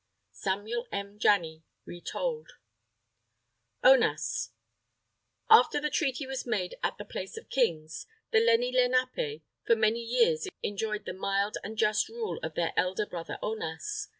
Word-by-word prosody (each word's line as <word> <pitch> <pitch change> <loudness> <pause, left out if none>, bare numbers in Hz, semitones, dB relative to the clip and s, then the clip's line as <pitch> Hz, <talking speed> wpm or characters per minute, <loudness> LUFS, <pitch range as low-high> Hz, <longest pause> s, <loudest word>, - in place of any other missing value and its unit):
Samuel 215 +5 -3
M. 200 +1 -5
Janney 165 -7 +2 0.2
(Retold) 465 - -4 1.3
ONAS - - +4 1.0
After 445 -8 +6
the 300 0 -2
Treaty 275 -2 0
was 265 0 -4
made 195 -6 -1
at - - -1
the - - -7
Place - - -6
of 450 - -11
Kings, 160 -11 0 0.2
the 220 - +5
Lenni 230 +2 +3
Lenapé, 255 - +1 0.2
for 230 - +6
many 220 +1 +2
years 460 - +2 0.2
enjoyed 210 +1 -2
the - - -4
mild 195 +2 -1
and 220 +1 -7
just 210 -1 +2
rule 455 -1 -4
of 160 0 -5
their 170 -1 0
"elder 185 +3 +1
brother 170 -4 -6
Onas." 220 - -4
225 Hz, 135 wpm, -29 LUFS, 195-290 Hz, 1.3 s, After